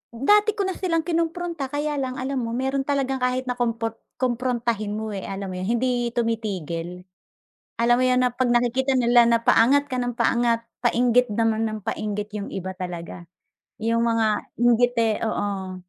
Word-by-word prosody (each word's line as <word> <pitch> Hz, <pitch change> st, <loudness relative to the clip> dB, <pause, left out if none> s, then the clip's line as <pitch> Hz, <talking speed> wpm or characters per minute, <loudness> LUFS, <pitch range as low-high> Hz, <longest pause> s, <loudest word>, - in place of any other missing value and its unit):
Dati 415 Hz, -, +3 dB
ko 405 Hz, -, 0 dB
na 380 Hz, -, -1 dB
silang 335 Hz, -3 st, -1 dB
kinompronta. 335 Hz, -3 st, -2 dB
Kaya 290 Hz, +1 st, -2 dB
lang 260 Hz, -1 st, -3 dB
alam 265 Hz, +1 st, -2 dB
mo, 230 Hz, -1 st, -3 dB
meron 265 Hz, +2 st, -1 dB
talagang 270 Hz, -2 st, 0 dB
kahit 250 Hz, 0 st, 0 dB
na 250 Hz, -1 st, -4 dB
kompor 230 Hz, -1 st, -2 dB, 0.2 s
komprontahin 235 Hz, -4 st, -1 dB
mo, 220 Hz, 0 st, -4 dB
eh, 195 Hz, -2 st, -4 dB
alam 195 Hz, -1 st, -5 dB
mo -, -, -6 dB
yun, 185 Hz, -, -3 dB
hindi 245 Hz, -1 st, 0 dB
tumitigil. 180 Hz, -7 st, -3 dB, 0.8 s
Alam 240 Hz, +1 st, +4 dB
mo 255 Hz, -, +3 dB
yun 250 Hz, 0 st, +3 dB
na 250 Hz, -, +1 dB
'pag 255 Hz, -1 st, +1 dB
nakikita 245 Hz, +3 st, +2 dB
nila 240 Hz, -1 st, +5 dB
na 235 Hz, -, +4 dB
paangat 275 Hz, +7 st, +5 dB
ka -, -, 0 dB
nang 245 Hz, 0 st, -1 dB
paangat, 235 Hz, -1 st, +1 dB, 0.2 s
painggit 245 Hz, 0 st, +3 dB
naman 225 Hz, +1 st, +1 dB
nang 215 Hz, 0 st, -5 dB
painggit 210 Hz, -1 st, -3 dB
yung 205 Hz, -1 st, -4 dB
iba 190 Hz, 0 st, -4 dB
talaga, 175 Hz, -1 st, -7 dB, 0.6 s
yung 230 Hz, +1 st, +1 dB
mga 230 Hz, -1 st, +2 dB, 0.3 s
inggite 240 Hz, -2 st, +3 dB
oo. 195 Hz, -3 st, -3 dB
240 Hz, 170 wpm, -24 LUFS, 220-260 Hz, 0.8 s, nila